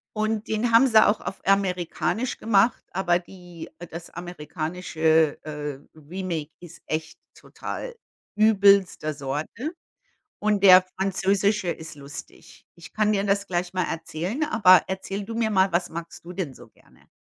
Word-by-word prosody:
Und 215 0 -1
den 225 +2 0
haben 235 +4 +6
sie 220 -3 +6
auch 205 - +2
auf 195 - -6
amerikanisch 195 +5 0
gemacht, 225 +1 +2
aber 175 -2 +1
die 175 -2 -12 0.2
das 170 +1 -8
amerikanische, 160 -2 -1
äh, 150 -2 -5 0.2
Remake 160 -1 -5
ist 175 -2 -13
echt 155 0 -4 0.2
total - - -7 0.4
übelster 200 -7 +4
Sorte 150 - -4 0.7
und 210 -1 0
der 185 -1 +9 0.2
französische 195 0 +1
ist 160 -2 -6
lustig. 140 0 -11
Ich 170 +1 -14
kann 215 0 +2
dir 200 -1 +1
das 200 0 0
gleich 175 0 -2
mal 185 -2 0
erzählen, 165 - -3
aber 195 - +6
erzähle 195 +1 -4
du 225 - -6
mir 225 -1 0
mal, 190 -2 +3
was 175 +1 0
magst 170 +1 -8
du 180 +1 -9
denn 170 -9 -4
so 120 - -15
gerne? - - -26
185 Hz, 145 wpm, -25 LUFS, 165-205 Hz, 0.7 s, der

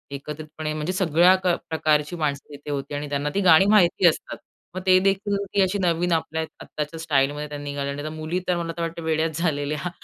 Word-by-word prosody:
एकत्रितपणे 155 +2 -6
म्हणजे 155 +4 -3
सगळ्या 180 0 +4
क - - 0 0.2
प्रकारची 155 0 +1
माणसं 150 -3 -2
तिथे 145 +1 -8
होती 140 +1 -4
आणि 145 0 -4
त्यांना 145 +1 -1
ती 200 - +2
गाणी 180 -1 +6
माहिती 190 -3 +5
असतात. 160 - -1 0.4
मग 185 - -3
ते 185 -1 +6
देखील 200 +1 0
अशी 190 +2 0
नवीन 175 0 +1
आपल्या 160 0 -1 0.2
आत्ताच्या 150 +2 -5
स्टाईलमध्ये 145 -1 0
त्यांनी 145 -1 -6
गायली 140 0 -3
आणि 155 - -4
मुली 155 +3 -2
तर 180 - +1
मला 165 -1 -3
तर - - -3
वाटत 165 0 -3
वेड्याच 160 -1 -1
झालेल्या 150 0 -1
160 Hz, 190 wpm, -24 LUFS, 150-175 Hz, 0.4 s, गाणी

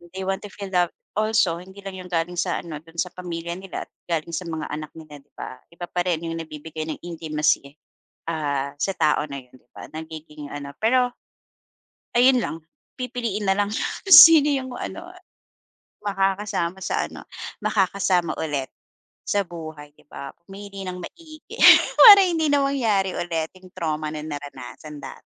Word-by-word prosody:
they 190 - -4
want 190 0 -1
to 205 - -8
feel 200 -1 -8
love 175 -1 +2 0.2
also 215 -6 +1
hindi 190 +2 -14
lang 195 - -5
'yong 185 -1 -9
galing 170 0 -1
sa 175 - -1
ano 155 -3 -7
do'n 165 +1 -19
sa 180 +1 -1
pamilya 170 -2 -5
nila 190 +1 -6 0.2
galing 165 0 -2
sa 175 -1 -3
mga 160 -2 -4
anak 155 0 -5
nila, 150 -3 -11
'di - - -37
ba? 130 - -8
Iba 175 +1 -7
pa 175 - -2
rin 170 -2 -1
'yong 165 0 -4
nabibigay 155 0 -7
ng 155 - -5
intimacy, 155 -3 -1 0.5
ah, 145 -4 -2
sa 195 - +1
tao 155 -2 +3
na 140 - -5
'yon, 125 - -25
'di 125 - -34
ba, - - -8
nagiging 155 -2 -8
ano 140 -1 -7
pero 245 +2 +3 1.0
ayun 250 +2 +6
lang 210 - -2 0.4
pipiliin 245 -5 -3
na 195 - +3
lang 205 +1 0
yung - - -2 0.2
sino 325 -4 +11
'yong 260 -2 -3
ano 345 +2 -6 1.0
makakasama 195 -2 -1
sa - - -1
ano - - -11 0.4
makakasama 190 -3 +1
ulit 145 -4 -2 0.6
sa 205 - +1
buhay, 155 -3 -9
'di - - -23
ba? 140 -1 -8
Pumili 195 0 -9
nang 180 0 -5
maigi 310 - -11 0.6
para 410 -4 +11
hindi 325 -4 +1
na 285 - +4
mangyari 220 -9 +1
ulit 165 -2 -2
'yong 185 -1 -16
trauma 155 -3 -3
na 155 - -5
naranasan 145 0 -8
dat. - - -9
175 Hz, 170 wpm, -23 LUFS, 155-200 Hz, 1.0 s, sino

